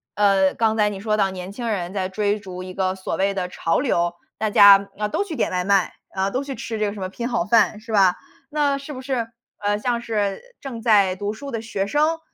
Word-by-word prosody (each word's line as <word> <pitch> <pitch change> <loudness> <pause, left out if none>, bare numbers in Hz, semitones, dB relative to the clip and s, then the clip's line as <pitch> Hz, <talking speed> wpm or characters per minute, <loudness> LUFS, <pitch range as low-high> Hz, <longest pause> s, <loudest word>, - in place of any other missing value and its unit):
呃， 195 -2 +3
刚 220 -1 +1
才 210 -1 +3
你 200 -2 -6
说 215 +1 0
到 195 -2 +2
年 185 0 -7
轻 235 +3 -5
人 185 -4 -2
在 190 -2 -1
追 205 +1 0
逐 185 -3 -8
一 185 0 -8
个 190 0 -1
所 190 - -4
谓 195 +1 +1
的 185 -2 -2
潮 165 -2 0
流， 175 -10 +1 0.2
大 215 -1 0
家， 200 -1 +7
呃， 210 - -1
都 390 - 0
去 335 -6 -6
点 - - 0
外 180 -1 0
卖， 195 -2 +2 0.2
呃， 190 +1 0
都 260 - -1
去 275 - -5
吃 225 - -5
这 210 - +1
个 200 - -2
什 205 - -9
么 185 - -3
拼 235 +5 -4
好 175 -8 0
饭， 210 -1 +3
是 225 0 -10
吧。 190 -4 +4 0.3
那 290 -2 +1
是 280 +2 -8
不 255 - -7
是， 255 -4 -2 0.3
呃， 205 0 0
像 235 +2 -1
是 210 -4 -2 0.2
正 240 -5 -6
在 205 -5 +4
读 205 +1 -3
书 280 +6 -8
的 230 -2 -3
学 205 -3 -2
生 305 +6 +1
205 Hz, 265 characters per minute, -22 LUFS, 190-230 Hz, 0.3 s, 家